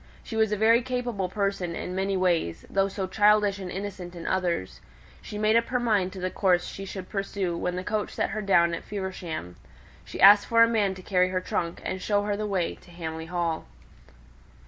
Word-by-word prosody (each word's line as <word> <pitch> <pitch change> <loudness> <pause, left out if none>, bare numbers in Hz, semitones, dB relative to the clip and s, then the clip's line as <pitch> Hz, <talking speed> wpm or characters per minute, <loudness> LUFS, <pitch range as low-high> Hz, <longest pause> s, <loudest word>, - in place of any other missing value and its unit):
She 225 - -7
was 220 -1 +2
a 210 - 0
very 225 +3 +5
capable 245 -6 -2
person 195 -4 -2
in 180 - -5
many 195 +1 0
ways, 170 - 0
though 195 0 +2
so 195 0 -3
childish 205 0 +3
and 185 -2 -6
innocent 190 -2 -6
in 170 - -8
others. 175 - -1 0.4
She 210 - -7
made 215 +1 +2
up 230 0 +3
her 250 - 0
mind 210 -6 +1
to 190 - -7
the 185 0 -2
course 180 -3 +2
she 195 - -7
should 190 -1 -7
pursue 195 -3 -2
when 180 +1 -2
the 180 - -3
coach 210 +1 -2
set - - -1
her 215 0 -3
down 170 -4 +3
at 170 - -4
Feversham. 180 - -5 0.5
She - - -9
asked 205 +1 +8
for 230 0 +6
a - - +5
man 210 -4 +1
to 185 - -11
carry 185 -1 +2
her 185 0 0
trunk, 170 -2 -3
and 185 - -3
show 205 0 +1
her 205 0 -1
the 210 +1 -3
way 185 -4 0
to - - -18
Hamley 160 -2 -6
Hall. 170 -2 -2
195 Hz, 215 wpm, -26 LUFS, 180-210 Hz, 0.5 s, asked